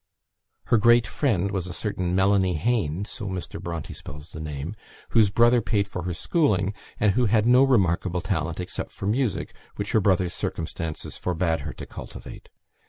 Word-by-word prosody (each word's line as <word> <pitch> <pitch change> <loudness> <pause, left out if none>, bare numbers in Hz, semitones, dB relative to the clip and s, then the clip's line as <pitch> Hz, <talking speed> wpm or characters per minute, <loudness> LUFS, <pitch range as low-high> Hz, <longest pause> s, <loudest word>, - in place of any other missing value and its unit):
Her 120 - +3
great 120 +2 +5
friend 100 -1 0
was 95 -3 -2
a 90 - -6
certain 90 -4 -2
"Mellany 95 -1 +3
Hane" 95 -1 0
(so 105 0 -6
Mr. 95 -2 -5
Bronte 85 -2 -5
spells 75 +3 -10
the 80 - -8
name), 75 +4 -5 0.3
whose 110 -3 +5
brother 120 +3 +4
paid 100 -2 0
for 90 -3 -5
her 90 - -2
schooling, 105 - +1 0.3
and 105 -1 +4
who 125 +5 +2
had 105 0 +3
no 125 +2 +6
remarkable 95 -8 +2
talent 85 -3 -2
except 90 - -4
for - - -7
music, 115 0 0 0.2
which 100 - -3
her 110 - +3
brother's 95 -2 +2
circumstances 80 -2 -4
forbade 85 -2 0
her 75 +1 -5
to - - -8
cultivate. - - -10
95 Hz, 170 wpm, -25 LUFS, 85-110 Hz, 0.3 s, no